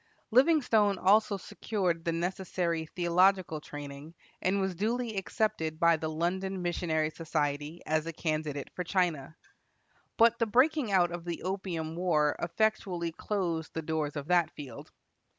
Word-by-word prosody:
Livingstone 240 - +4
also 205 +2 +4
secured 190 -4 -2
the 170 - +1
necessary 170 -1 -2
theological 180 -1 +2
training, 145 +2 -9 0.3
and 190 +2 +1
was 190 -1 0
duly 225 +4 -1
accepted 190 -6 -1
by 170 0 +5
the 160 0 -3
London 185 +4 -2
Missionary 160 -3 0
Society 150 0 -2
as 155 +1 0
a - - -2
candidate 155 -3 -3
for 180 - -3
China. 170 -5 -1 0.8
But 230 +1 +5
the 230 - +2
breaking 255 +2 +3
out 175 -3 +4
of 175 -1 -5
the 170 -1 -4
Opium 175 -4 -3
war 155 -4 +2
effectually 180 -2 0
closed 170 -3 -3
the 160 - -2
doors 155 -1 -2
of 145 -1 -5
that 175 -2 +4
field. 135 -6 -10
175 Hz, 140 wpm, -30 LUFS, 160-195 Hz, 0.8 s, by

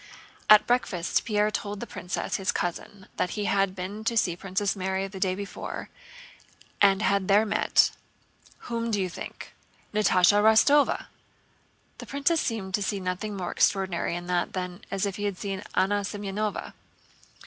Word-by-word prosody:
At 210 0 +8
breakfast 200 -8 0
Pierre 210 -2 +1
told 205 -1 -4
the - - -5
princess, 180 +1 -3
his 195 0 0
cousin, 190 +2 -4
that 180 - -1
he 210 - -1
had 195 -2 +1
been 200 +3 -5
to 230 0 0
see 175 -6 +2
Princess 195 +3 -1
Mary 190 0 -2
the 195 -1 -9
day 185 -1 +1
before 200 0 -6 0.9
and 200 0 +5
had 200 -3 +1
there 205 +2 +5
met—"Whom 230 +2 -1
do 210 -3 0
you 185 -1 -1
think? - - -8 0.4
Natásha 205 -1 +4
Rostóva!" 245 +7 +4 0.9
The - - -8
princess 285 +4 +1
seemed 205 -6 -3
to 205 - +1
see 200 0 -1
nothing 185 +3 -3
more 180 -2 -3
extraordinary 190 -3 +1
in 175 0 -5
that 175 -1 -1
than 180 +1 -4
if 195 0 -2
he 205 - -3
had 200 -3 -2
seen 195 -1 -4
Anna 200 +2 +2
Semënovna. 205 +1 -4
200 Hz, 155 wpm, -27 LUFS, 185-210 Hz, 0.9 s, At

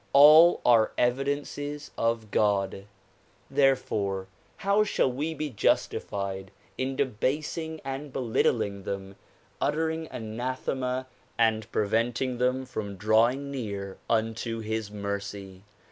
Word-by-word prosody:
All 155 +5 +8
are 115 -3 +5
evidences 145 +3 -1
of 115 -2 -1
God; 100 -2 +1 0.7
therefore 110 -8 +1 0.3
how 200 0 +3
shall 170 -10 +1
we 150 +6 -3
be 150 -1 -3
justified 100 -3 -1 0.3
in 130 +1 -2
debasing 145 +6 -1
and 135 +1 -5
belittling 110 -5 0
them, 95 0 -5 0.5
uttering 160 +1 0
anathema 125 +3 -3 0.3
and 110 -2 +2
preventing 115 +4 0
them 130 +1 +1
from 105 -5 -5
drawing 115 +7 +2
near 100 -7 -5
unto 115 0 0
his 110 -1 -3
mercy. 100 -2 -5
120 Hz, 100 wpm, -28 LUFS, 105-140 Hz, 0.7 s, All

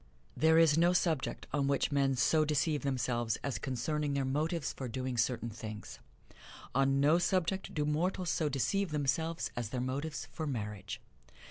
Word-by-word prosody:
There 160 +1 +4
is 165 -1 +5
no 175 +1 +4
subject 165 -6 0
on 140 -1 +1
which 140 +1 +1
men 135 -1 +2
so 155 +6 +3
deceive 150 0 +1
themselves 120 -4 0
as 130 -6 -2
concerning 140 +3 -1
their 135 -1 0
motives 150 +1 -1
for 130 - -5
doing 130 +1 -3
certain 120 0 0
things. 110 -1 -8 0.7
On 135 +1 +3
no 150 +5 +5
subject 185 +1 0
do 150 -1 +1
mortals 175 +4 0
so 155 -2 +1
deceive 185 +8 0
themselves 155 +3 -1
as 120 -3 -3
their 125 - -3
motives 140 +4 -3
for 160 -2 -4
marriage. 105 -6 -4
140 Hz, 160 wpm, -33 LUFS, 130-160 Hz, 0.7 s, is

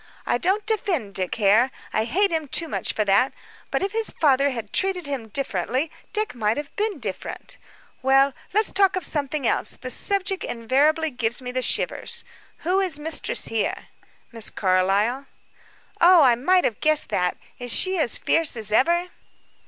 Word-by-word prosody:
"I 240 - 0
don't 390 +6 0
defend 355 - -2
Dick 185 -2 -2
Hare 220 +4 +3 0.2
I 220 - +1
hate 380 - +1
him 320 -2 -2
too 330 +5 +2
much - - -2
for 215 - -1
that 200 +7 +2 0.4
but - - -1
if 390 - -2
his 450 0 +2
father 280 -2 +3
had 230 -6 -6
treated 380 -3 +1
him 275 -5 -4
differently, 255 - -2 0.2
Dick 430 0 -2
might 220 -1 -1
have 295 -1 -7
been 420 -3 -2
different. 210 -8 -6 0.4
Well, 270 +1 +3 0.2
let's 430 +2 +2
talk 390 -1 +3
of 370 - -2
something 290 -2 -2
else; - - +2
the 255 - -5
subject 395 +3 +2
invariably 290 +7 +1
gives 240 -1 -1
me 250 -1 -6
the 255 0 -2
shivers. - - -1 0.4
Who 370 +3 +2
is 370 -6 +1
mistress 310 +1 -1
here?" 225 -2 -3 0.4
"Miss 230 -2 -1
Carlyle." 200 +8 0 0.7
"Oh, 345 -2 +7
I 250 -3 +5
might 360 +10 +2
have 220 - -1
guessed 310 -1 +3
that. 180 0 -1 0.2
Is 245 -1 -4
she 375 +6 +1
as 295 - +1
fierce 325 -6 +1
as 215 -2 -1
ever?" 345 +10 +2
275 Hz, 170 wpm, -23 LUFS, 230-360 Hz, 0.7 s, Oh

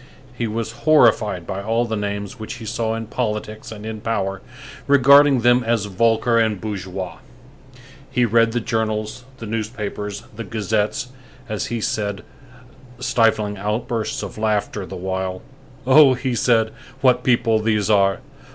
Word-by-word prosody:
He 120 -1 -2
was 110 +1 -3 0.2
horrified 110 - +4
by 95 +4 -4
all 115 +3 0
the 110 -1 -3
names 100 +2 -4
which 110 +2 -6
he 115 -2 -9
saw 110 0 -2
in 115 0 -4
politics 110 -1 -4
and 105 -1 -8
in 110 -1 -6
power, 100 -4 -2 0.5
regarding 140 -1 +6
them 120 +1 +4
as 115 -3 0
vulgar 115 +4 +2
and 110 -3 +1
bourgeois. 95 -3 -5 0.9
He 125 -2 +2
read 115 0 +3
the 120 - 0
journals, 110 0 -2
the 115 - -8
newspapers, 105 -2 -4
the 115 - -5
gazettes 110 +5 -1 0.4
as 105 -3 -3
he 120 -1 -3
said, 100 -2 -2 0.7
stifling 110 -4 +1
outbursts 110 +2 -2
of 100 +1 -7
laughter 105 -2 -1
the - - -7
while. 95 0 -3 0.4
"Oh!" 135 0 +7
he 130 0 -2
said, 115 -2 +2 0.3
"what 130 -2 +3
people 115 -3 +3
these 105 -2 0
are! 100 -2 +3
110 Hz, 145 wpm, -21 LUFS, 105-120 Hz, 0.9 s, Oh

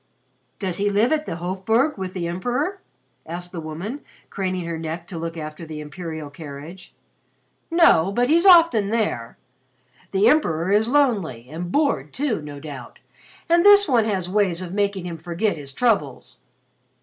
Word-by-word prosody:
"Does 185 -3 -2
he 205 +1 +1
live 210 +5 +2
at 310 -1 0
the - - -3
Hofburg 195 - 0
with 190 -1 -6
the 175 -2 -2
Emperor?" 250 - -2 0.5
asked 175 +2 -6
the 170 - -6
woman, 175 - -6 0.3
craning 185 -2 -2
her 165 -1 -4
neck 165 +1 -5
to 175 - -6
look 165 0 -5
after 155 +1 -7
the 155 -1 -7
imperial 155 0 -7
carriage. 150 +4 -10 0.8
"No, 330 - +4
but 245 +4 +1
he's 335 +6 +4
often 330 - +6
there. 210 - -2 0.7
The 195 +1 +3
Emperor 180 - +2
is 210 +2 +3
lonely 205 - +1
and 175 +2 -5
bored 290 +2 0
too, 260 - -1
no 145 -1 -8
doubt, 140 -5 -9 0.5
and 340 +1 +4
this 410 0 +7
one 235 -5 +3
has 190 -5 -1
ways 185 -3 +1
of 185 -1 -6
making 200 -2 -1
him 170 -2 -6
forget 175 +6 -1
his 140 -3 -8
troubles. 195 - -1
185 Hz, 160 wpm, -22 LUFS, 165-235 Hz, 0.8 s, this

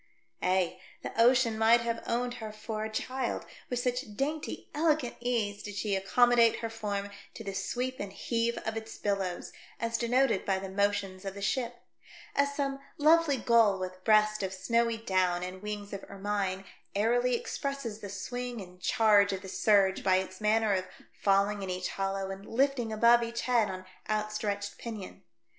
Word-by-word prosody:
Ay, 185 -1 +1 0.2
the - - -5
ocean 240 -1 +5
might 230 +2 +6
have 230 0 -2
owned 245 +1 0
her 215 -1 -5
for 215 0 -5
a 220 - -3
child, 255 +3 -2 0.2
with 245 - -1
such 245 -3 -2
dainty, 295 +5 -3
elegant 300 -4 +1
ease 230 -4 -1
did 205 -1 -7
she 205 -1 0
accommodate 235 +4 +4
her 230 -1 -3
form 205 -2 -3 0.2
to 225 - -7
the 200 -2 -4
sweep 255 +6 -2
and 200 -1 -5
heave 235 +2 -1
of 220 0 -2
its 225 0 -6
billows, 195 -3 -2 0.3
as 230 0 -1
denoted 245 -2 +2
by 195 -1 +1
the 190 0 -5
motions 200 -1 0
of 195 0 -5
the 200 - -7
ship; 240 +2 -1 0.5
as 280 0 +1
some 275 -1 -1 0.2
lovely 310 -1 +5
gull 230 -4 +4
with 185 0 -6
breast 215 0 +4
of 190 -1 -3
snowy 230 +4 +1
down 185 -5 +1
and 185 +1 -6
wings 205 -1 -5
of 200 - -5
ermine 195 -1 -2 0.3
airily 240 +4 +2
expresses 260 -3 -4
the 205 -2 -7
swing 245 +5 -4
and 180 -2 -11
charge 205 0 +4
of 190 -1 -4
the - - -7
surge 195 -2 +3
by 185 - +4
its 185 +1 -2
manner 215 0 +3
of 185 -1 -1 0.3
falling 200 +1 +2
in 190 - -4
each 180 0 -2
hollow 195 0 -2
and 195 +1 -8
lifting 255 -2 +1
above 235 +2 +5
each 235 0 -3
head 235 -3 +2
on 185 0 -6 0.2
outstretched 210 -1 -2
pinion. 220 -5 -7
215 Hz, 175 wpm, -30 LUFS, 195-240 Hz, 0.5 s, might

